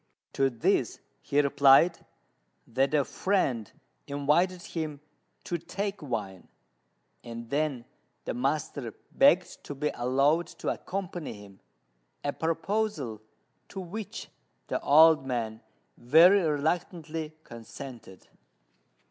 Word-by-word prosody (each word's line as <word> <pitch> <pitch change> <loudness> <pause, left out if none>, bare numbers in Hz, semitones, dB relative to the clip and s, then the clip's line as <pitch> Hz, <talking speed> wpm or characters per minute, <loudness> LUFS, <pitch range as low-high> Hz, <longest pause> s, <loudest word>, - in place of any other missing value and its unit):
To 135 0 +2
this 115 -3 0 0.2
he 145 - 0
replied 140 +4 +5 0.6
that 135 +5 +1
a 145 -3 +3
friend 135 - 0 0.4
invited 155 +6 +1
him 155 -5 -5 0.4
to 175 - -3
take 200 +4 -4
wine; 105 - -5 0.8
and 115 -1 -8
then 140 -4 -1 0.4
the - - -2
master 135 -1 -2 0.2
begged - - +3
to 145 - -6
be 150 +2 -1
allowed 140 +7 +2
to - - -3
accompany 180 -4 -4
him, 100 -2 -14 0.6
a 145 - -1
proposal 165 - -2 0.5
to 195 - -7
which 190 +4 -7 0.4
the - - -1
old 155 0 +6
man 115 -3 -3 0.4
very 170 +10 +6
reluctantly 160 0 -2
consented. 115 -3 -11
145 Hz, 105 wpm, -28 LUFS, 125-170 Hz, 0.8 s, old